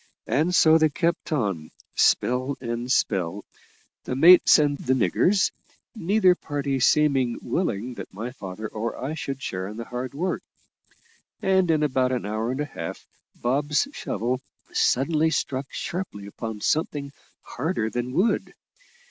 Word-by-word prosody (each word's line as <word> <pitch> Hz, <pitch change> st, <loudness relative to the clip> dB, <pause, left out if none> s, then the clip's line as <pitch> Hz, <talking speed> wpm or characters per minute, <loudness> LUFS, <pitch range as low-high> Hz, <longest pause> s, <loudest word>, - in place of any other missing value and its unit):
And 165 Hz, +6 st, +1 dB
so 160 Hz, -1 st, +6 dB
they 155 Hz, 0 st, +4 dB
kept 170 Hz, +3 st, -1 dB
on, 100 Hz, -, -1 dB, 0.2 s
spell 130 Hz, +3 st, +2 dB
and 120 Hz, 0 st, -3 dB
spell, 95 Hz, -5 st, 0 dB, 0.6 s
the 125 Hz, -, -3 dB
mates 175 Hz, +6 st, +8 dB
and 145 Hz, -2 st, +2 dB
the 130 Hz, +1 st, +1 dB
"niggers," 175 Hz, -, +2 dB, 0.4 s
neither 195 Hz, -2 st, +3 dB
party 145 Hz, -5 st, -3 dB
seeming 135 Hz, -3 st, +3 dB
willing 125 Hz, -, -2 dB
that -, -, -9 dB
my 110 Hz, +6 st, -5 dB
father 105 Hz, -3 st, -7 dB
or 110 Hz, +2 st, -4 dB
I 135 Hz, +4 st, -4 dB
should 135 Hz, -4 st, -5 dB
share 95 Hz, 0 st, -3 dB
in 105 Hz, +2 st, -8 dB
the 115 Hz, -, -5 dB
hard 125 Hz, +3 st, -5 dB
work; 180 Hz, +5 st, -1 dB, 1.0 s
and 190 Hz, -2 st, +2 dB
in 155 Hz, -2 st, +3 dB
about 130 Hz, -3 st, +1 dB
an 125 Hz, -4 st, -2 dB
hour 110 Hz, +2 st, -2 dB
and 130 Hz, +3 st, -2 dB
a -, -, -1 dB
half, 145 Hz, -, -7 dB, 0.3 s
Bob's 145 Hz, -, 0 dB
shovel 125 Hz, +3 st, -2 dB, 0.3 s
suddenly 155 Hz, +4 st, +2 dB
struck 135 Hz, -3 st, -2 dB
sharply 170 Hz, -, -5 dB
upon 105 Hz, +1 st, -6 dB
something 145 Hz, -1 st, -1 dB, 0.3 s
harder 125 Hz, -6 st, -2 dB
than 120 Hz, +3 st, -3 dB
wood. 195 Hz, -, 0 dB
130 Hz, 145 wpm, -25 LUFS, 115-155 Hz, 1.0 s, mates